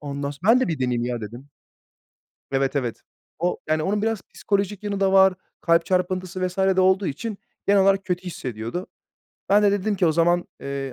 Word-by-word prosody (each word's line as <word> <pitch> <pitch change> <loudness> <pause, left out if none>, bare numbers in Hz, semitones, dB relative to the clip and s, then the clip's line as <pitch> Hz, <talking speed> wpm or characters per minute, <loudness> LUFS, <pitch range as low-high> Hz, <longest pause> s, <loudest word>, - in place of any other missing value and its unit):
Ondan 140 -1 -4
s 145 - -10
"Ben 230 +5 +6
de 260 - +1
bir 160 - -2
deneyeyim 125 -2 0
ya." 120 -1 -3
dedim. 120 +6 -9 1.0
Evet, 135 +1 0
evet. 120 -4 -2 0.4
O 175 +2 -1
yani, 155 0 +1
onun 205 +4 0
biraz 225 -2 -1
psikolojik 200 0 -1
yanı 200 -1 -3
da 195 -1 +2
var. 190 -1 +6 0.3
Kalp 170 0 +3
çarpıntısı 185 0 -1
vs. 180 +1 -7
de 190 -1 +3
olduğu 190 +1 +3
için 205 +9 -4 0.3
genel 200 0 +5
olarak 195 0 +3
kötü 180 -1 -2
hissediyordu. 125 - -5 0.6
Ben 205 +1 +5
de 205 - +4
dedim 205 +1 0
ki, 185 -3 +2
"O 160 - +3
zaman, 175 +2 +2 0.2
eee, 140 -1 -4
180 Hz, 190 wpm, -23 LUFS, 140-195 Hz, 1.0 s, Ben